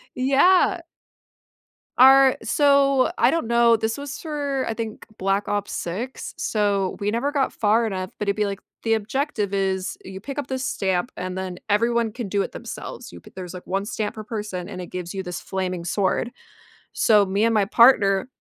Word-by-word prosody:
Yeah. 345 +8 +4 1.2
Our 265 +1 +7
so, 280 -2 +3
I 240 - +5
don't 330 -6 -1
know 235 -1 +5
this 220 +2 -2
was 285 -1 -6
for, 285 -4 -2
I 225 - -2
think 220 -1 -6
Black 195 +2 0
Ops 205 -1 -2
6, 220 +10 -5
so 200 -3 0
we 205 0 0
never 240 +6 -1
got 280 -2 0
far 225 +2 +2
enough, 185 -3 -4
but 210 - -3
it'd 200 - +1
be 210 - +1
like, 200 -1 -4 0.2
the 225 -1 +3
objective 220 -1 -2
is, 190 -1 -1
you 190 0 -8
pick 275 +7 -7
up 290 - -2
this 260 0 -3
stamp, 190 -1 -1
and 185 0 -5
then 185 -1 -5
everyone 230 +2 +1
can 235 -2 -5
do 200 +1 +1
it - - -6
themselves. - - -8
You 85 - -10
p - - -16
there's, 180 -2 -7
like, 180 - -10
1 195 +2 -1
stamp 210 0 -3
per 215 - -7
person 210 -5 -5
and 185 - -7
it 180 - -6
gives 180 -1 -6
you 195 - -4
this 180 -1 -5
flaming 185 -2 -3
sword, 195 +6 0 0.6
so 210 -2 +4
me 195 +2 0
and 230 - +2
my 210 -2 +3
partner 205 -3 +5
210 Hz, 190 wpm, -23 LUFS, 190-255 Hz, 1.2 s, Our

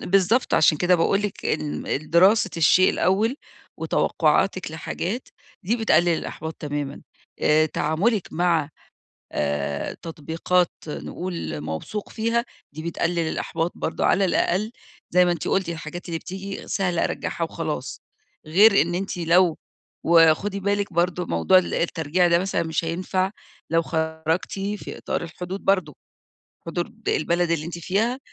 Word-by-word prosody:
بالضبط، 195 +6 +2
عشان 155 -1 +4
كده 180 0 +4
باقول 195 +4 +2
لِك 205 -2 -4
ال 150 - -2
الدراسة 185 - +3
الشيء 170 +3 +5
الأول 210 +8 +1 0.4
وتوقُّعاتِك 185 -4 +1
لحاجات، 180 +8 -4 0.3
دي 220 +6 0
بتقلِّل 175 -7 +3
الإحباط 160 -1 -3
تمامًا. 145 -2 -5 0.4
آآ 155 +1 +4
تعامُلِك 180 +8 0
مع 170 -3 +1 0.6
آآ 70 0 -2
تطبيقات 165 +2 0 0.2
نقول 170 - -5
موثوق 80 - -5
فيها، 230 +2 0 0.3
دي 155 +2 -7
بتقلِّل 170 +1 -1
الإحباط 165 +1 -2
برضه - - -3
على 195 +2 +3
الأقل 190 +4 +1 0.4
زي 180 +1 +5
ما 175 - +2
أنتِ 170 - -4
قُلت 190 -3 +1
الحاجات 170 +2 -6
اللي 165 -1 -2
بتيجي 195 +3 -7
سهلة 180 -3 0
أرجّعها - - -2
وخلاص. - - -4 0.5
غير 200 +6 +6
إن 175 +1 -2
أنتِ 195 0 -3
لو 170 0 +3 0.5
وخُدي 170 +4 +4
بالكِ 200 0 -1
برضه 175 +1 0
موضوع 85 - +4
ال 185 - -1
الترجيع 170 +1 +1
ده 170 0 +4
مثلًا 190 0 -1
مش 160 0 -1
هينفع، 185 +3 -1 0.4
لو 165 0 +3
خرجتِ 160 +1 -2
في 200 +1 -4
إطار - - -3
الحدود 180 +3 -6
برضه. 185 -7 +1 0.7
حدود 195 +7 -4
البلد 170 +2 +1
اللي 160 -2 0
أنتِ 170 0 -6
فيها، 220 +9 0
175 Hz, 135 wpm, -24 LUFS, 160-195 Hz, 0.7 s, غير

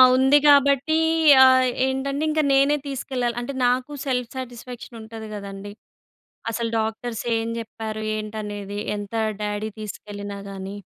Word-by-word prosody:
ఉంది 265 +3 +5
కాబట్టి. 280 +2 +5 0.5
ఆహ్, 260 0 +6 0.2
ఏంటంటే, 275 +3 -1
ఇంక 310 0 +2
నేనే 275 +2 +4
తీసుకెళ్లాలి. 250 -3 -2
అంటే 245 +3 -5
నాకు 250 +3 +1
సెల్ఫ్ 250 -3 -1
సాటిస్ఫాక్షన్ 245 -1 -8
ఉంటది 220 0 -8
కదండీ! 200 0 -7 0.8
అసలు 230 0 -2
డాక్టర్స్ 225 +1 -3
ఏం 225 - -2
చెప్పారు, 220 -1 -6
ఏంటనేది 210 -1 -5 0.2
ఎంత 205 +2 -6 0.3
డ్యాడీ 210 +1 -2
తీసుకెళ్ళినా 205 -1 -7
గాని. 195 +1 -7
230 Hz, 120 wpm, -23 LUFS, 210-260 Hz, 0.8 s, ఆహ్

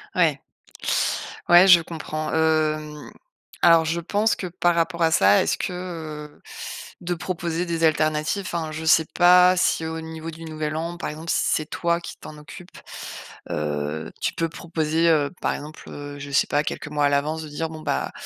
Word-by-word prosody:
Ouais, - - +3 1.1
ouais, 175 +2 +8
je 180 -3 +8
comprends, 155 -1 -5
hem, 155 -2 0 0.5
alors, 165 -1 +6
je 170 +2 -1
pense 205 +5 +1
que 185 - -5
par 175 0 +1
rapport 170 0 0
à 165 - +3
ça, 100 -8 +5
est-ce - - 0
que, - - -3
heu, 160 -4 -7 0.6
de 175 0 -2
proposer 175 -1 -3
des 165 -1 -2
alternatives, 155 +4 +1
enfin, 165 -3 -3
je 160 +1 -6
sais 160 0 +5
pas 180 +1 +6
si 165 -2 +1
au 160 0 -4
niveau 160 0 -7
du 165 +1 -11
Nouvel 155 -1 -4
An, 170 +2 -4
par - - -4
exemple, 155 +2 -8
si - - +2
c'est 155 - +1
toi 170 0 0
qui 170 - -9
t'en 150 - -10
occupes, 150 +5 -12 0.7
heu, 75 +1 -3
tu - - 0
peux 165 -1 -1
proposer, 165 -1 -1
heu, 150 -3 +2
par - - 0
exemple, 145 -1 -8
je 140 0 -8
sais 140 - +3
pas 145 +1 +1
quelques 150 - -5
mois 150 -1 +1
à - - +4
l'avance 150 +3 0
de - - -8
dire: 160 +2 -3
«Bon 160 -1 -9
bah, 65 - -2
160 Hz, 185 wpm, -23 LUFS, 150-170 Hz, 1.1 s, ouais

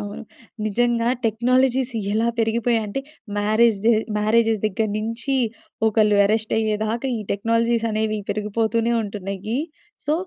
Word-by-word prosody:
అవును. 205 +2 -6 0.4
నిజంగా 235 +2 +1 0.2
టెక్నాలజీస్ 255 +3 +2 0.2
ఎలా 220 +2 +1
పెరిగిపోయాయంటే, 225 0 0 0.4
మ్యారేజ్ 215 +1 +3
దె 235 - +6 0.3
మ్యారేజెస్ 220 0 +2
దగ్గర 215 +1 -1
నుంచీ 230 +5 -2 0.5
ఒకళ్ళు 215 -1 +3
అరెస్ట్ 215 +2 0
అయ్యేదాకా 220 +3 -1
ఈ - - -4
టెక్నాలజీస్ 230 +2 +1
అనేవి 215 0 0
పెరిగిపోతూనే 220 +2 0
ఉంటున్నాయి. 200 +2 -4 0.5
సో 295 - +2
220 Hz, 110 wpm, -22 LUFS, 215-235 Hz, 0.5 s, దె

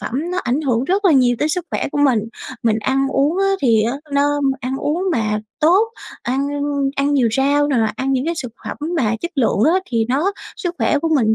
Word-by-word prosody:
phẩm - - -6 0.2
nó 365 - -2
ảnh 250 +5 0
hưởng 255 -4 0
rất 390 +6 0
là 350 - +5
nhiều 245 -3 +4
tới 300 - +1
sức 345 +2 -2
khỏe - - -1
của 290 - -2
mình, 270 -6 +4 0.4
mình 225 -1 +2
ăn 270 +4 0
uống 285 +7 +1
á 390 - +2 0.2
thì 225 -4 +4
á 235 +5 -1 0.2
nó 290 +1 +2 0.2
ăn 260 +1 -3
uống 315 +6 -1
mà 215 -4 0 0.2
tốt, 375 +9 +4 0.3
ăn 270 +3 -1 0.5
ăn 280 +1 +1
nhiều 250 -5 +3
rau 285 +2 +2
nè, 270 - +1 0.2
ăn 270 +1 -1
những 260 +1 0
cái 340 - 0
xực 250 -7 -6
phẩm - - -5 0.2
mà 230 -7 +1
chất 340 - -4
lượng 225 -5 +1
á 375 - +2
thì 230 -2 +1
nó 300 +10 +1 0.2
sức 355 -5 -3
khỏe 295 - +2
của 325 - -1
mình 220 -6 +3
275 Hz, 230 wpm, -19 LUFS, 245-310 Hz, 0.5 s, là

